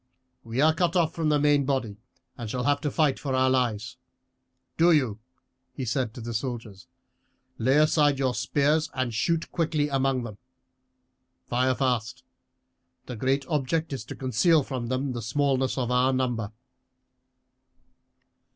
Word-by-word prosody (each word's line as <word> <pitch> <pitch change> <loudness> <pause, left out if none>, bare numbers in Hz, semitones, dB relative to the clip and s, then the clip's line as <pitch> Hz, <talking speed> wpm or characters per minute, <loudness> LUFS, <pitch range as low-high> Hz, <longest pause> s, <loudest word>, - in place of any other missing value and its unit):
We 115 +3 -2
are 155 +1 +5
cut 170 +1 0
off 165 -2 +2
from 160 -2 -1
the 150 - +3
main 145 -1 +3
body 130 -7 -2 0.4
and 115 -3 -6
shall 125 +2 -2
have 145 +2 +1
to 150 - -1
fight 145 -1 +1
for 140 -4 -2
our 130 0 +3
lives. 120 -2 -1 0.8
Do 170 +1 +4
you," 130 -10 +2 0.6
he 130 - -4
said 125 0 -1
to 120 - -8
the 115 +1 -5
soldiers, 115 -5 -5 0.7
"lay 130 +5 +3
aside 150 -2 +3
your 130 -2 0
spears 145 +6 +1
and 130 -3 -1
shoot 160 +9 -1
quickly 155 -3 0
among 135 -2 0
them. 105 -4 -8 1.1
Fire 130 +1 +1
fast. 125 -2 -1 0.8
The 125 - -6
great 135 +4 0
object 155 0 -1
is 130 - -4
to - - -8
conceal 135 +5 +2
from 130 -3 -4
them 130 +2 -2
the 120 - -4
smallness 130 +3 0
of 125 -2 -1
our 125 +1 +3
number." 120 -5 -1
130 Hz, 150 wpm, -26 LUFS, 120-145 Hz, 1.1 s, are